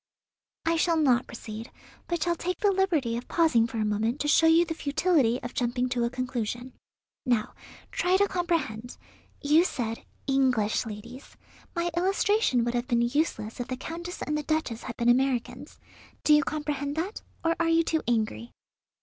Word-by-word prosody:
"I 330 0 +2
shall 335 0 +2
not 260 -5 +3
proceed, 225 0 -8 0.4
but 345 -2 -1
shall 345 -1 +1
take 360 +2 -3
the 410 - +3
liberty 340 -12 +1
of 240 - -7
pausing 290 -10 +3
for 235 -1 -6
a 215 - +1
moment 220 +5 0
to 295 - -1
show 325 +2 +5
you 330 +1 +5
the 325 - -3
futility 285 -5 +1
of 240 - -6
jumping 245 +1 0
to 245 -1 0
a - - 0
conclusion. 250 -1 -4 0.5
Now, 240 -5 0 0.4
try 365 +1 +2
to 405 +1 +3
comprehend. 325 - -2 0.5
You 300 +4 +5
said, 230 -9 -3 0.2
English 255 -6 +1
ladies. 235 +5 -10 0.4
My 345 0 0
illustration 380 - +2
would 240 0 -1
have 245 0 -1
been 235 -1 +2
useless 240 -4 -1
if 245 - -3
the 255 - -4
Countess 340 +6 -6
and 300 - -2
the 300 - 0
Duchess 300 -7 -2
had 235 - -7
been 235 - 0
Americans. 250 0 +1 0.5
Do 305 - +5
you 300 - +6
comprehend 290 -2 -3
that, 360 +7 -3 0.2
or 330 0 +3
are 335 -1 +2
you 330 0 +4
too 320 -1 0
angry?" 230 0 -1
270 Hz, 175 wpm, -27 LUFS, 240-330 Hz, 0.5 s, you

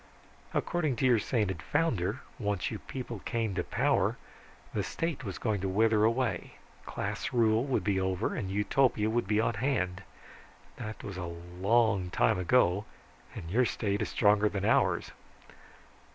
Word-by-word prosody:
"According 155 -7 0
to 130 - 0
your 120 -3 +5
sainted 105 - -1
founder, 115 - 0 0.2
once 105 -4 -1
you 110 - -4
people 120 -4 -6
came 115 +1 -2
to 90 -1 -1
power - - +1 0.6
the - - 0
State 165 -4 -3
was 100 -5 -5
going 105 -4 -1
to 95 - -1
wither 110 +2 +3
away, 115 +2 0 0.3
class - - -3
rule 115 0 +3
would 125 -8 0
be 95 0 +1
over, 95 +2 -1
and 100 -6 -3
Utopia 105 +2 +2
be 110 -2 +1
on 115 - +1
hand. 100 -6 -1 0.8
That 110 -2 -7
was 100 -3 -6
a 90 - -4 0.4
long 100 -3 +3
time - - +2
ago, 95 0 +3 0.5
and 85 0 -7
your 125 +5 +3
State 100 -3 -1
is - - -1
stronger 105 -1 +3
than 100 -1 -3
ours." - - +2
105 Hz, 150 wpm, -30 LUFS, 95-120 Hz, 0.8 s, your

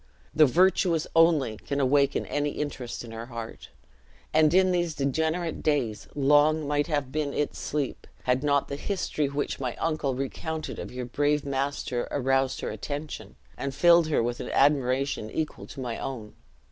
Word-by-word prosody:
The 155 -1 +6
virtuous 175 +1 +3
only 155 -9 +4
can 140 +5 -3
awaken 140 +1 +2
any 145 0 -1
interest 135 -6 -4
in 115 - -9
her 115 +1 -7
heart; 115 -2 -8 0.6
and 155 -1 +5
in 185 +1 +4
these 175 -3 0
degenerate 160 +4 -1
days 135 -9 0
long 150 +2 +4
might 145 +1 +1
have 145 -5 -1
been 150 -1 -2
its 150 - -1
sleep 145 -3 -3 0.2
had 125 +2 +1
not 140 -1 +2
the 140 - -4
history 155 -4 -1
which 140 +1 -3
my 125 -3 -3
uncle 155 -5 -1
recounted 155 +4 -4
of - - -6
your 125 0 -5
brave 145 +4 0
master 135 -2 -2
aroused 135 -1 +1
her - - -3
attention, 145 - -6 0.2
and 140 -1 -4
filled 170 -2 +6
her 150 -6 +2
with 120 +1 -2
an - - -5
admiration 135 -4 +2
equal 155 +5 -4
to 140 - -10
my 120 -3 -4
own. 115 -6 -6
145 Hz, 165 wpm, -27 LUFS, 130-155 Hz, 0.6 s, The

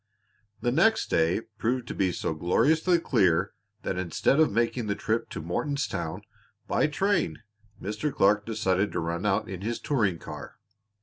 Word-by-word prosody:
The 120 - +1
next 220 - +3
day 80 +6 +2 0.2
proved 125 +2 0
to - - -3
be 95 -2 +1
so 80 - -2
gloriously 155 - +3
clear 95 - +2 0.3
that 90 - -2
instead 90 - +1
of 160 - +4
making 115 +1 0
the 100 - 0
trip 110 +2 -1
to 80 - -6
Mortonstown 95 - -2 0.4
by - - +2
train 175 - 0 0.4
Mr. 105 +9 -2
Clark 105 -1 +3
decided 105 -3 0
to - - -1
run 85 +4 -2
out 95 - +1
in 95 -1 -6
his 115 +3 -2
touring 105 - +1
car. - - -9
105 Hz, 160 wpm, -27 LUFS, 90-135 Hz, 0.4 s, of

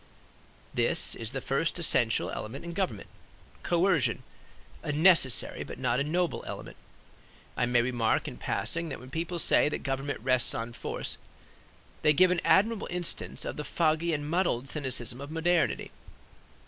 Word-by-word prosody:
This - - +2
is 115 -1 -5
the 135 0 -4
first 140 +7 0
essential 120 -9 +3
element 125 +9 -6
in 170 - -5
government, 170 - -2 0.5
coercion; 175 -4 +2 0.6
a - - -3
necessary 155 -5 +4
but - - -8
not 125 -1 0
a - - +1
noble 170 +4 -1
element. - - -7 0.8
I 120 - +1
may 120 -1 +3
remark 120 -3 0
in - - -7
passing 170 - -2
that - - -6
when 130 +1 -12
people 170 +2 -3
say 150 - +4
that - - -4
government 135 +1 -2
rests 130 0 +2
on 115 +1 -4
force - - -4 0.8
they 150 - +4
give 185 +5 +5
an 175 -2 +1
admirable 215 +2 +3
instance 175 -1 -2
of - - -5
the 150 - -3
foggy 160 +2 +1
and 145 -2 -2
muddled 160 -7 0
cynicism 130 -4 -1
of 140 - -7
modernity. 165 +2 0
150 Hz, 155 wpm, -29 LUFS, 125-170 Hz, 0.8 s, give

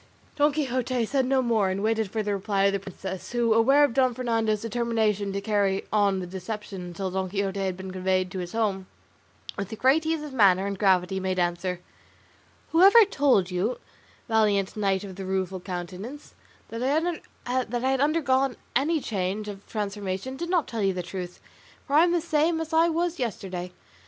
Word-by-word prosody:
Don 295 +1 +3
Quixote 255 -4 -1
said 265 +2 0
no 265 0 +2
more, 220 -5 +2
and 190 +2 -2
waited 220 -1 +1
for 215 +2 -2
the 205 0 -1
reply 200 0 0
of 200 0 +3
the 200 - 0
princess, 190 +1 -7
who 235 -2 +2
aware 270 +6 +5
of 285 -5 +2
Don 255 -1 +2
Fernando's 225 -4 0
determination 220 -3 0
to 200 0 -3
carry 200 -2 0
on 200 -2 +3
the 185 - -3
deception 190 +2 -6
until 180 +2 -5
Don 190 0 -2
Quixote 200 0 -2
had 190 -2 -2
been 190 0 -7
conveyed 185 0 0
to 190 - -4
his 175 -1 -6
home, 200 -4 -1 0.7
with 200 +3 -4
great 270 +7 +3
ease 320 -1 0
of 295 -3 -8
manner 195 -5 +4
and 200 -1 -4
gravity 190 -1 +2
made 185 0 -2
answer, 175 0 -1 0.9
"Whoever 395 +7 +7
told 270 - +2
you, 190 +7 -1 0.5
valiant 210 -4 +2
Knight 195 -2 0
of 190 -2 -9
the 195 - -5
Rueful 190 0 -2
Countenance, 185 +10 -7 0.4
that 230 +1 -5
I 260 -5 -1
had 270 0 +1
undergone 275 -4 +2 0.2
any 305 +6 +2
change 200 -1 -2
or 200 -2 -6
transformation 205 +2 -4
did 340 +5 -5
not 350 -4 +1
tell 230 -2 -4
you 195 -1 +2
the 180 -1 -4
truth, 180 0 -7 0.5
for 280 - -6
I 315 - +7
am 350 - +1
the 345 -1 +1
same 320 0 +1
as 320 0 -5
I 330 +1 +5
was 340 +1 -1
yesterday. 185 -6 -4
210 Hz, 185 wpm, -26 LUFS, 190-260 Hz, 0.9 s, Whoever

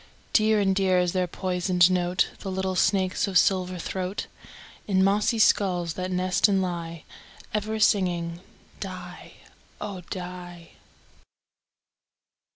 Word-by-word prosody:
Dear 215 -1 +4
and 195 -2 +2
dear 190 -1 +2
is 180 -1 +1
their 185 -1 0
poisoned 180 0 +2
note, 180 0 +1
The 195 - -6
little 190 0 -2
snakes' 185 +1 +1
of 190 -2 +2
silver 185 -1 +2
throat, 185 +3 -4 0.6
In 190 -2 +3
mossy 210 +4 +2
skulls 180 -6 +2
that 185 +2 -4
nest 185 +2 +2
and 195 -2 +2
lie, 170 -3 -4 0.5
Ever 215 +1 -2
singing 175 -5 +1 0.4
"die, 180 -2 -8 0.5
oh! 200 -3 -6
die." 180 -2 -8
185 Hz, 120 wpm, -26 LUFS, 180-195 Hz, 0.6 s, Dear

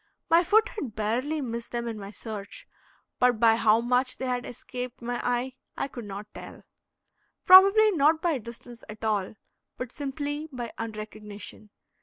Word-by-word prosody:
My 335 +2 +6
foot 440 +7 +4
had 270 - -6
barely 250 +9 -1
missed 235 -2 -5
them 235 0 -3
in 225 -2 -4
my 200 0 -7
search, 210 -1 -8 0.5
but 245 -3 +3
by 225 -1 +6
how 225 0 +4
much 250 +2 +1
they 260 - -4
had 250 -1 -2
escaped 250 +1 -7
my 245 0 -3
eye 245 +1 -1 0.2
I - - -1
could 240 -4 -8
not 205 +1 -8
tell. - - -10 0.8
Probably 395 +4 +8
not 315 -2 +3
by 325 -5 0
distance 235 +1 -11
at 215 +1 -10
all, 210 -2 -1 0.4
but 255 -1 -5
simply 290 +2 -4
by 240 -3 -6
unrecognition. 215 -1 -8
245 Hz, 160 wpm, -27 LUFS, 220-285 Hz, 0.8 s, Probably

